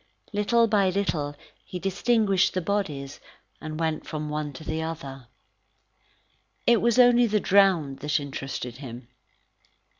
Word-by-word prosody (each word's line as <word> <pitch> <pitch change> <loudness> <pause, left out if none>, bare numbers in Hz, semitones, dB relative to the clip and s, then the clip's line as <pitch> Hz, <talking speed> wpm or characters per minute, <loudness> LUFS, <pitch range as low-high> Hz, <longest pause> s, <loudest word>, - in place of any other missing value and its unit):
Little 230 +3 +3
by 205 -3 +2
little 165 -7 -1 0.3
he 180 - -7
distinguished 195 +1 +1
the - - +2
bodies, 155 -8 -3 0.4
and 155 0 -6
went 160 -1 -2
from 150 -1 -4
one 150 -1 -3
to 145 - -10
the 160 +1 -3
other. 140 -6 -6 1.4
It 235 -1 +4
was 235 0 +2
only 245 -1 +6
the 210 -1 +1
drowned 185 -9 +3
that 150 +2 0
interested 135 -3 -6
him. 125 -3 -9
165 Hz, 130 wpm, -26 LUFS, 145-205 Hz, 1.4 s, only